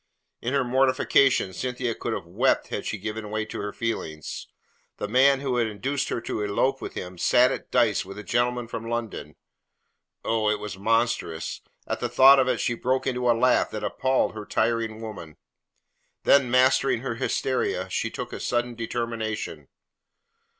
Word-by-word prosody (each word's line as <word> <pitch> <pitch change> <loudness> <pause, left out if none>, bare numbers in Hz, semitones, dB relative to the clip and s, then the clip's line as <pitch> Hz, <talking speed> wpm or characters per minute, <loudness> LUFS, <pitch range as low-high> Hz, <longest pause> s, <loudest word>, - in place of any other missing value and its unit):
In 125 +4 -1
her 135 - +3
mortification, 130 -4 +3
Cynthia 125 +2 -2
could - - -4
have - - -3
wept - - +1
had - - -4
she - - -2
given 105 +1 -5
way 110 0 -2
to - - -7
her 105 0 -4
feelings. 80 - -4 0.5
The 105 - -3
man 135 +4 +4
who 130 -3 -1
had 120 -2 +2
induced 130 +7 -2
her - - -1
to 110 - -3
elope 130 +6 0
with - - -7
him 90 -1 -7
sat 125 +7 +4
at - - -5
dice 115 -4 +2
with 95 +1 -10
a 105 - -7
gentleman 120 +1 0
from 115 0 -6
London! 120 -2 -4 0.9
Oh, 110 -1 +1
it 105 - +1
was 105 -3 -6
monstrous! 110 -6 -1 0.2
At - - -3
the 120 - -2
thought 135 +3 +7
of 130 - +3
it - - +1
she 120 - 0
broke 130 +3 -1
into 125 -2 0
a 115 - +4
laugh 125 +1 +3
that 110 - -6
appalled 130 0 +1
her 110 -1 -6
tiring 115 -1 0
woman; 100 -9 -8 0.9
then 140 -3 +5
mastering 130 0 +3
her 135 -2 -3
hysteria, 110 -8 0
she 115 - -1
took 120 +1 -6
a - - -5
sudden 120 0 -1
determination. 115 - -4
115 Hz, 175 wpm, -25 LUFS, 110-130 Hz, 0.9 s, thought